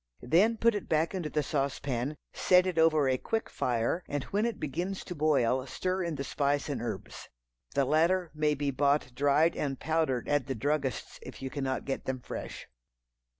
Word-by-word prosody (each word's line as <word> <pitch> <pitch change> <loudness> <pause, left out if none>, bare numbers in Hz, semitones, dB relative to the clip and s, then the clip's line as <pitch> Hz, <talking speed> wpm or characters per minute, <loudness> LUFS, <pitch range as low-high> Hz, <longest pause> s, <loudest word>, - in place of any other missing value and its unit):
Then 200 - +4
put 230 +1 +4
it 205 - -4
back 160 +2 +2
into 175 -5 -3
the 150 0 0
sauce 140 -2 -1
pan, 135 +2 -3 0.2
set 180 0 +4
it 180 -3 0
over 155 -3 +4
a 130 -1 +1
quick 225 0 -2
fire, 120 +8 0
and 145 -2 -2
when 210 - 0
it 235 - -4
begins 175 +7 -3
to 180 - -6
boil, 135 -5 +2
stir 185 +6 -2
in 170 -2 -2
the 140 - -3
spice 145 +1 0
and 145 - -2
herbs. 120 -2 -6 0.5
(The 140 - +3
latter 165 +5 +2
may 150 -1 +1
be 140 0 -1
bought 140 -1 +1
dried 145 +5 +3
and 135 -3 -2
powdered 155 -6 0
at 145 -2 +1
the 135 - -2
druggist's 140 +3 -2
if - - -10
you 130 - -4
cannot 135 -2 -2
get 135 - -3
them 130 -1 -2
fresh.) - - -7
145 Hz, 195 wpm, -30 LUFS, 135-165 Hz, 0.5 s, Then